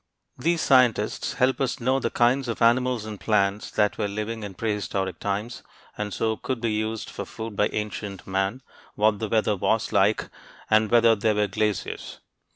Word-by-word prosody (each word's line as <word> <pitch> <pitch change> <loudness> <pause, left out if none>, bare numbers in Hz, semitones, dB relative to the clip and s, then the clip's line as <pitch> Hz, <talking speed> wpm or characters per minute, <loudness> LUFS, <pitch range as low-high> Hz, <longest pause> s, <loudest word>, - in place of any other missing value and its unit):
These 170 0 0
scientists 125 -5 +3
help 130 +1 +1
us 130 -3 0
to - - -12
know 130 +2 +2
the - - -1
kinds 125 +2 +2
of 115 - -3
animals 120 -1 +2
and 105 -2 -7
plants 100 -1 +1
that 105 -1 0
were 105 - +1
living 105 +2 -4
in 100 -3 -7
prehistoric 100 -4 -2
times 105 +4 -3 0.3
and 105 -1 -4
so 110 +2 -1
could 130 -3 -3
be 115 -1 -1
used 110 +1 -2
for - - -6
food 110 -1 -7
by 105 - +3
ancient 105 -2 -5
man; 95 +6 -1 0.3
what 105 -1 +2
the 110 - -3
weather 110 -1 +2
was 110 +4 0
like; 100 +3 +2 0.4
and 110 0 +4
whether 115 -1 +5
there 105 +1 +1
were 105 0 +2
glaciers. 105 0 -3
110 Hz, 180 wpm, -25 LUFS, 105-115 Hz, 0.4 s, whether